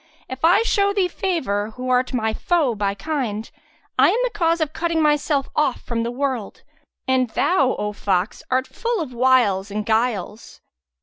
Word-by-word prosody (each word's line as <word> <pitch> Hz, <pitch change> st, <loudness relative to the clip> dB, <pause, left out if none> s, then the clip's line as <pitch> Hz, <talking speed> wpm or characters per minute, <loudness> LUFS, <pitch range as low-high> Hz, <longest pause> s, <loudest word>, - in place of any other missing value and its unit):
If 260 Hz, +2 st, -8 dB
I 355 Hz, +7 st, +5 dB
show 400 Hz, -3 st, +2 dB
thee 390 Hz, -3 st, +2 dB
favour 245 Hz, -, -2 dB
who 255 Hz, 0 st, -4 dB
art 250 Hz, 0 st, +2 dB
my 220 Hz, -4 st, 0 dB
foe 320 Hz, -3 st, +1 dB
by 200 Hz, -2 st, -1 dB
kind, 230 Hz, -4 st, -3 dB, 0.5 s
I -, -, +7 dB
am -, -, +1 dB
the -, -, 0 dB
cause 335 Hz, -5 st, +1 dB
of 310 Hz, -2 st, -1 dB
cutting 335 Hz, -1 st, -1 dB
myself 295 Hz, -2 st, +1 dB
off 290 Hz, -4 st, +1 dB
from 235 Hz, -1 st, -3 dB
the 230 Hz, -, -2 dB
world; 250 Hz, -4 st, -3 dB, 0.4 s
and 260 Hz, -2 st, +2 dB
thou, 270 Hz, +1 st, +2 dB
O 210 Hz, 0 st, -3 dB
fox, 195 Hz, 0 st, -1 dB
art 255 Hz, +1 st, +1 dB
full 470 Hz, -, -3 dB
of 295 Hz, -7 st, -4 dB
wiles 235 Hz, -6 st, +3 dB
and 210 Hz, +1 st, -3 dB
guiles. 220 Hz, -2 st, -1 dB
255 Hz, 175 wpm, -21 LUFS, 220-320 Hz, 0.5 s, I